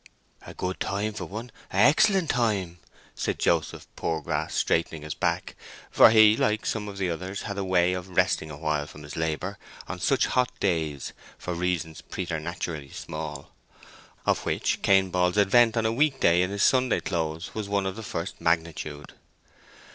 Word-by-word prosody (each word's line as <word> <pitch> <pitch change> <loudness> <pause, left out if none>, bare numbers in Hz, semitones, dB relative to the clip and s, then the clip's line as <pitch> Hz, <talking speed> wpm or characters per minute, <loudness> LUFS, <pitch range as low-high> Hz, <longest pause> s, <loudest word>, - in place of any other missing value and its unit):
"A - - -9
good 90 0 -3
time 105 +2 -2
for 110 - -5
one—a' 115 +4 -9
excellent 190 - +4
time," 100 -8 0 0.3
said - - -2
Joseph - - 0
Poorgrass, 80 -1 -2
straightening 80 -2 0
his 75 -1 -4
back; - - -2 0.4
for - - +8
he, 110 -1 +7
like 110 0 0
some 105 -2 -2
of 100 -1 -7
the 95 -3 -1
others, 95 +4 -5
had 100 - -4
a - - -1
way 90 -1 +2
of 90 0 -5
resting 90 -3 +1
a 70 - -8
while 75 -1 -1
from 75 - -12
his 75 - -9
labour 80 +5 -2 0.3
on - - -5
such - - +2
hot 125 -1 +1
days 80 -7 -1 0.2
for 90 - -4
reasons 85 -2 -2
preternaturally 85 -4 -4
small; 75 -2 -7 0.7
of - - +1
which - - -1
Cain 95 -1 +4
Ball's 90 +1 +1
advent 115 +3 +5
on 115 - +1
a 110 - +1
week 140 +2 +2
day 85 +1 +4
in 90 - +1
his 100 0 -1
Sunday 130 -1 +3
clothes 80 -1 -3
was 105 -2 -4
one 100 -1 0
of 95 - -2
the 110 - -7
first 90 -4 -5
magnitude. 80 -3 -2
90 Hz, 170 wpm, -26 LUFS, 80-105 Hz, 0.7 s, for